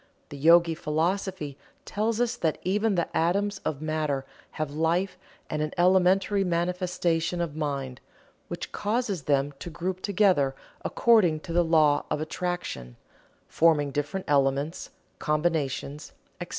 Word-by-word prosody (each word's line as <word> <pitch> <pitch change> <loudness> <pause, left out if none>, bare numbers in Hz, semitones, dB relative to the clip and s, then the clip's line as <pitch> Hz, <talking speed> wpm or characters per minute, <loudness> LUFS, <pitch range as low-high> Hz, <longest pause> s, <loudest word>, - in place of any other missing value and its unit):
The 145 - -8
Yogi 165 +2 +6
philosophy 160 -1 -2 0.3
tells 220 +2 -1
us 245 0 +1
that 160 -7 -1
even 205 +3 +1
the 170 - -2
atoms 195 +4 +1
of 150 0 -4
matter 155 -3 -1 0.3
have 155 -2 -3
life 170 +5 0 0.3
and 150 - -3
an 155 0 -2
elementary 190 +2 +3
manifestation 175 -1 0
of 165 -4 -2
mind, 140 -4 -3 0.5
which - - -6
causes 210 -4 -1
them 140 0 +1
to - - -6
group 185 +3 -4
together 185 -10 +2 0.3
according 190 -10 +3
to 165 - -7
the 175 +1 +4
law 155 -3 +3
of 150 - -1
attraction, 155 - -4 0.5
forming 155 -3 +3
different 145 +7 -3
elements, 140 +3 +1 0.3
combinations, 150 -2 -1 0.3
etc. - - -6
165 Hz, 130 wpm, -27 LUFS, 150-185 Hz, 0.5 s, Yogi